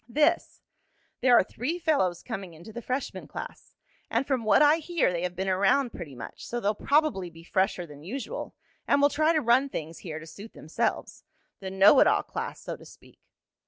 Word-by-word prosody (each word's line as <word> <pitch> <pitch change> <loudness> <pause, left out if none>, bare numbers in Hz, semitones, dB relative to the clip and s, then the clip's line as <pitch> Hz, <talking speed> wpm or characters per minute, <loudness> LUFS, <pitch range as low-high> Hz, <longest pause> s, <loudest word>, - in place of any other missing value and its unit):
"This. 305 +7 +1 0.6
There 250 -2 +6
are - - +5
three 260 - -4
fellows 280 - +1
coming 195 -8 -6
into 175 +8 -12
the 240 - -6
freshman 255 +3 -4
class. - - -9 0.3
And - - 0
from 260 -4 -1
what 215 +6 +5
I 295 +2 +6
hear 330 - 0
they 170 - -2
have 180 0 -3
been 190 +2 -3
around 200 +8 +2
pretty 150 -6 -8
much, 120 - -9
so 240 - -4
they'll 210 -2 +1
probably 280 - +1
be 165 0 -15
fresher 185 0 0
than 145 -3 -13
usual 265 - -6 0.3
and - - +4
will 285 0 +5
try 310 +2 +2
to 315 -2 +2
run 255 +3 +3
things 160 - -6
here 160 -4 -6
to 160 - -9
suit 200 +7 -11
themselves. 155 - -3 0.4
The 190 - -6
know 195 +7 +6
it - - +6
all - - +3
class, - - -5
so - - -6
to - - -15
speak." - - -17
215 Hz, 200 wpm, -27 LUFS, 180-280 Hz, 0.6 s, There